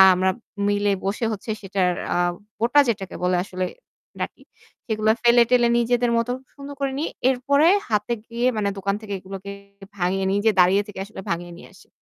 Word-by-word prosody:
আমরা 185 +1 +2 0.4
মিলে 205 0 +2
বসে 205 +4 -1
হচ্ছে 215 +2 -6
সেটার 190 -2 0 0.2
আ - - -1 0.4
বোটা 240 +6 +4
যেটাকে 195 -5 -2
বলে 180 0 +2
আসলে 185 -1 -3 0.5
ডাটি, - - -5 0.4
সেগুলো 215 -2 0
ফেলে 240 0 +7
টেলে 245 -1 +4
নিজেদের 240 0 +2
মতো 230 +1 0 0.2
সুন্দর 280 0 -9
করে 275 -1 0
নিয়ে। 320 - -1 0.2
এরপরে 280 +4 +3 0.2
হাতে 210 +2 0
গিয়ে 235 +2 -1
মানে 205 -1 +1
দোকান 200 +1 -1
থেকে 205 -2 -6
এগুলোকে 195 +1 -8 0.5
ভাঙিয়ে 190 +1 0
নিয়ে 205 +3 +3
দাঁড়িয়ে 185 +3 +5
থেকে 205 - -9
আসলে 205 -2 -9
ভাঙিয়ে 175 +1 -3
নিয়ে - - -12
আসি। 180 - -19
205 Hz, 170 wpm, -23 LUFS, 190-240 Hz, 0.5 s, ফেলে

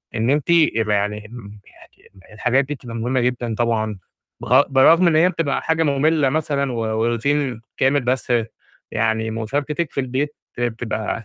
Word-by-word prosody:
إن 115 +3 0
أنتِ 145 +2 0
يبقى 115 -11 +3
يعني 105 +1 -1
ال 105 -2 -11
يعني 95 +1 -20
الحاجات 125 +5 +1
دي 145 - -4
بتبقى 120 -3 -10
مهمة 125 +3 -1
جدًا. 120 -2 -1
طبعًا 110 -3 -1 0.4
بر 130 +3 +5
برغم 165 +6 +5
إن 160 - +3
هي 170 +3 +5
بتبقى 165 -5 -1
حاجة 160 0 +1
مُملّة 145 0 +2
مثلًا، 140 -2 -1
و - - -4
و 110 +1 0
روتين 125 0 -1 0.2
كامل 135 +1 +2
بس 125 0 -1 0.6
يعني 110 0 0
مشاركتِك 145 +8 -2
في - - -4
البيت 135 +4 -3 0.2
بتبقى 115 -1 -3
125 Hz, 160 wpm, -21 LUFS, 110-145 Hz, 0.6 s, بر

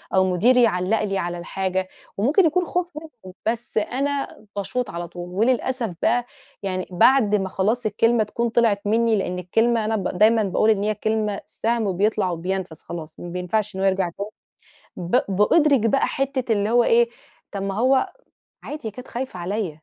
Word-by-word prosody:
أو 190 0 +4
مديري 245 +7 +4
يعلِّق 200 0 +1
لي 195 -2 -1
على 175 -1 -2
الحاجة، 185 +1 -2 0.3
وممكن 290 - +3
يكون 360 +3 +2
خوف 355 +1 -2
منهم، 245 - -11
بس 235 0 -2
أنا 275 +5 -1 0.3
باشوط 225 +4 -2
على 170 0 -5
طول، 175 +1 -8
وللأسف 235 +1 0
بقى 240 +1 +2 0.4
يعني 185 -2 -3
بعد 210 +3 +4
ما 190 -2 -1
خلاص 220 +6 0
الكلمة 225 +2 +2
تكون 235 +3 -2
طلعت 225 -3 +2
مني، 230 +1 +3
لأن 180 -3 -2
الكلمة 225 +5 +1
أنا 220 - 0
ب 185 -3 -2
دايمًا 220 +1 +5
باقول 200 +3 +2
إن 205 -2 +2
هي 215 0 0
كلمة 215 -1 -1
سهم 220 -2 -1
بيطلع 205 -1 +1
وبينفَذ 180 0 -3
خلاص، 160 -2 -8
ما 175 - -7
بينفعش 190 +4 -2
إنه 190 - -2
هو 195 - +4
يرجع 190 -2 +1
تاني. 200 +1 -4 0.7
ب 180 +7 +1
بأدُرِك 265 - +4
بقى 275 - +2
حتة 270 -3 -2
اللي 205 0 0
هو 240 +1 +4
إيه 235 0 +4 0.4
طَب 200 -1 -4
ما 195 0 -2
هو 260 +5 +2 0.5
عادي، 295 -6 -6
هي - - -4
كانت 250 +4 -10
خايفة 245 -6 -5
عليّا، 195 +2 -2
215 Hz, 180 wpm, -23 LUFS, 190-240 Hz, 0.7 s, دايمًا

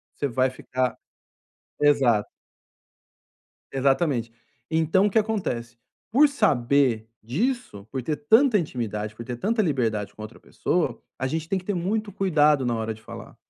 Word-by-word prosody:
você 145 - -1
vai 130 +1 +1
ficar 130 0 -2 0.9
exato. 135 -8 +3 1.5
Exatamente. 135 -3 +1 0.4
Então, 160 +5 +3
o - - +1
que 195 - 0
acontece? 180 - -1 0.3
Por 290 +5 +6
saber 140 - +2 0.2
disso, 155 - -2
por 130 -2 -3
ter 150 +3 -2
tanta 220 - +4
intimidade, 110 -8 -4
por 115 - -8
ter 120 +1 -4
tanta 220 - +1
liberdade 115 - -1
com 110 - -12
a - - -4
outra 110 - -13
pessoa, - - -1 0.2
a 130 - -2
gente 160 +4 -3
tem 195 - +1
que 185 - -7
ter 205 - -1
muito 205 +4 -1
cuidado 150 -8 +3
na 120 -1 0
hora 110 0 -2
de 110 - -15
falar. - - -10
140 Hz, 155 wpm, -25 LUFS, 120-190 Hz, 1.5 s, Por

